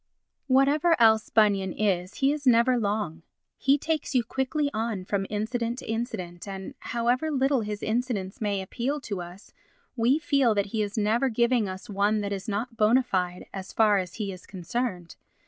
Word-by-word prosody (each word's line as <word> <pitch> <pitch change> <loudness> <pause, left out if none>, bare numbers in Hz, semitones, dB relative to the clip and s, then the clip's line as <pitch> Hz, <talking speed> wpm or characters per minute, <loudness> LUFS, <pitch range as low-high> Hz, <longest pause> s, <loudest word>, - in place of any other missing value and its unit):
Whatever 285 +5 +3
else 220 -1 +5
Bunyan 200 -3 +3
is 185 -3 -1
he 275 +1 +2
is 290 -2 -5
never 245 +1 +5
long; 205 -7 -2 0.4
he 275 +2 +4
takes 310 -1 -2
you 245 - +4
quickly 275 +5 -1
on 220 -4 -2
from 195 0 -1
incident 230 +3 -2
to - - -8
incident 220 -6 -4
and, 195 +5 -6
however 245 +6 0
little 270 -2 +2
his 210 -1 -5
incidents 220 -5 -2
may 200 -2 -1
appeal 255 +9 -2
to 200 -8 -4
us, 175 +3 -11 0.4
we 245 +4 +3
feel 275 -8 +2
that 200 -1 +1
he 220 - +1
is 205 0 -3
never 225 +5 +2
giving 235 -2 +2
us 185 +4 -8
one 205 +1 +1
that 200 0 -2
is 195 +1 -5
not 225 +3 -3
bona 225 +5 +4
fide 180 -5 -2 0.2
so 185 - -13
far 210 -3 +4
as 180 -1 -5
he 205 -3 -3
is 185 -1 -11
concerned. 185 -1 -4
220 Hz, 180 wpm, -27 LUFS, 200-250 Hz, 0.4 s, else